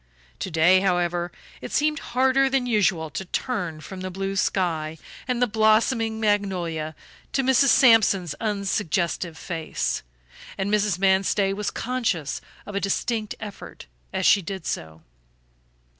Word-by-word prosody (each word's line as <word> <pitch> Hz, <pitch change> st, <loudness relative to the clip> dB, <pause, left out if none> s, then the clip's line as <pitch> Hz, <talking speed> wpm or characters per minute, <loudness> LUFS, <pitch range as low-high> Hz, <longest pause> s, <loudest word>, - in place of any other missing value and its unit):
To -, -, -3 dB
day, 175 Hz, +3 st, +5 dB
however, 175 Hz, -2 st, 0 dB, 0.3 s
it -, -, -7 dB
seemed 300 Hz, 0 st, +1 dB
harder 265 Hz, +2 st, +2 dB
than 265 Hz, -2 st, +1 dB
usual 190 Hz, -9 st, +1 dB
to 190 Hz, -, -4 dB
turn 180 Hz, -5 st, -3 dB
from 185 Hz, +3 st, -8 dB
the 185 Hz, -, -4 dB
blue 195 Hz, +1 st, -3 dB
sky 160 Hz, -5 st, 0 dB, 0.3 s
and 250 Hz, -1 st, 0 dB
the 245 Hz, -, +4 dB
blossoming 220 Hz, +1 st, +2 dB
magnolia 180 Hz, -7 st, -1 dB, 0.4 s
to 270 Hz, -, +1 dB
Mrs. 265 Hz, +1 st, +4 dB
Sampson's 220 Hz, -, +5 dB
unsuggestive 190 Hz, -5 st, -1 dB
face, 165 Hz, -3 st, -3 dB, 0.6 s
and 200 Hz, +1 st, -1 dB
Mrs. 210 Hz, -3 st, +2 dB
Manstey 195 Hz, +1 st, +2 dB
was 210 Hz, +1 st, -2 dB
conscious 225 Hz, -, -2 dB, 0.2 s
of 205 Hz, -, -8 dB
a 200 Hz, -, 0 dB
distinct 215 Hz, +2 st, -1 dB
effort 205 Hz, -, -9 dB, 0.3 s
as -, -, -1 dB
she 200 Hz, -, +6 dB
did 190 Hz, +2 st, -6 dB
so. 80 Hz, 0 st, -5 dB
195 Hz, 135 wpm, -24 LUFS, 175-225 Hz, 0.6 s, she